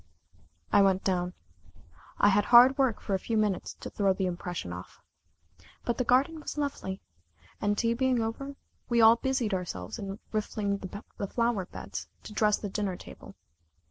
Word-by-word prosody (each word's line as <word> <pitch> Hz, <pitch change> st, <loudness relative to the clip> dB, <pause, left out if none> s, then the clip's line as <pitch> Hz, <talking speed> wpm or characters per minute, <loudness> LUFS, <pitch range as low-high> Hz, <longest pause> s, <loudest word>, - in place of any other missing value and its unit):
I -, -, +7 dB
went 190 Hz, -1 st, +3 dB
down. 180 Hz, -1 st, 0 dB, 0.8 s
I 205 Hz, -, +5 dB
had 205 Hz, +1 st, +3 dB
hard 245 Hz, +4 st, +8 dB
work 260 Hz, -5 st, +2 dB
for 200 Hz, -, -3 dB
a 190 Hz, -, +2 dB
few 225 Hz, +3 st, -2 dB
minutes 210 Hz, -4 st, 0 dB
to -, -, -5 dB
throw 195 Hz, -2 st, +2 dB
the 190 Hz, 0 st, -1 dB
impression 175 Hz, -, -4 dB
off. 90 Hz, +1 st, -10 dB, 0.9 s
But 235 Hz, 0 st, -1 dB
the -, -, +3 dB
garden 265 Hz, +6 st, +2 dB
was 300 Hz, -, -6 dB
lovely, 275 Hz, -10 st, -3 dB, 0.6 s
and 205 Hz, 0 st, +1 dB
tea 230 Hz, +1 st, +2 dB
being 255 Hz, 0 st, +1 dB
over, 250 Hz, +5 st, -3 dB, 0.3 s
we 235 Hz, -1 st, +3 dB
all 225 Hz, +1 st, +8 dB
busied 255 Hz, -4 st, 0 dB
ourselves 130 Hz, -, -4 dB
in 195 Hz, 0 st, -5 dB
rifling 210 Hz, -2 st, -1 dB
the 200 Hz, +2 st, -8 dB, 0.2 s
flowerbeds 230 Hz, -4 st, -2 dB, 0.2 s
to 215 Hz, -, -9 dB
dress 210 Hz, -1 st, +3 dB
the 205 Hz, -, -5 dB
dinner 195 Hz, -2 st, -2 dB
table. -, -, -12 dB
210 Hz, 165 wpm, -29 LUFS, 190-235 Hz, 0.9 s, hard